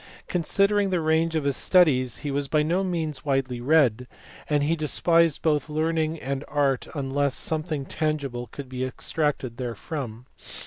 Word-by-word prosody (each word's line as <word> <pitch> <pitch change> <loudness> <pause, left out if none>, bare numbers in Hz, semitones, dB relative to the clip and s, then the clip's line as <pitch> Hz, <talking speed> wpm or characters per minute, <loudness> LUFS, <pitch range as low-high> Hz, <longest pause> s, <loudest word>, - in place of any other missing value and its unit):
Considering 200 +4 +2
the 180 -2 +1
range 160 +1 +1
of 155 - +1
his 140 -1 0
studies 130 -10 +3
he 145 - -1
was 140 0 -1
by 150 +1 +2
no 175 +5 +1
means 160 -7 -3
widely 135 -4 -1
read, 125 -4 +3 0.4
and 145 -1 +2
he 160 +3 +2
de 155 -2 -3
spised 165 -1 +2
both 155 -1 +1
learning 160 +1 0
and 135 0 -3
art 140 -3 +1
unless 140 -1 0
something 155 -1 -2
tangible 140 -6 -2
could 135 +5 -8
be 130 0 -4
extracted 130 -1 -2
therefrom. 125 0 -5
150 Hz, 155 wpm, -25 LUFS, 135-160 Hz, 0.4 s, studies